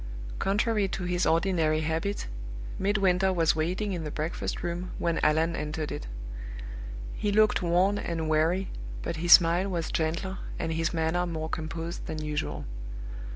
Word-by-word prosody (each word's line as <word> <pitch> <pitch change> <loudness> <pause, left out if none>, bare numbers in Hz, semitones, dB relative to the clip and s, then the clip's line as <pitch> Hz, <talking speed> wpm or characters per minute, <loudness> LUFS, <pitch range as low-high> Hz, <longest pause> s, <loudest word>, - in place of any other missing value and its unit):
Contrary 210 +1 +2
to 190 - -4
his 180 0 +1
ordinary 165 -3 +3
habit, 160 +6 -1 0.5
Midwinter 190 -1 +3
was 165 -4 +3
waiting 180 +6 0
in 170 -3 -3
the 150 - -3
breakfast 155 +3 -3
room 175 +1 -3
when 170 -1 0
Allan 160 +2 +3
entered 150 0 -3
it. - - -5 1.1
He 205 - -1
looked 215 +1 +4
worn 185 +4 +3
and 165 -2 -2
weary, 160 +5 +2 0.3
but 165 - -2
his 175 +2 +7
smile 175 +2 +6
was 170 -3 -2
gentler 170 +4 -1 0.2
and 165 -1 -1
his 165 +1 0
manner 170 +2 +1
more 160 -2 -3
composed 165 +2 -4
than 155 - -3
usual. 150 -1 -3
170 Hz, 150 wpm, -28 LUFS, 160-190 Hz, 1.1 s, his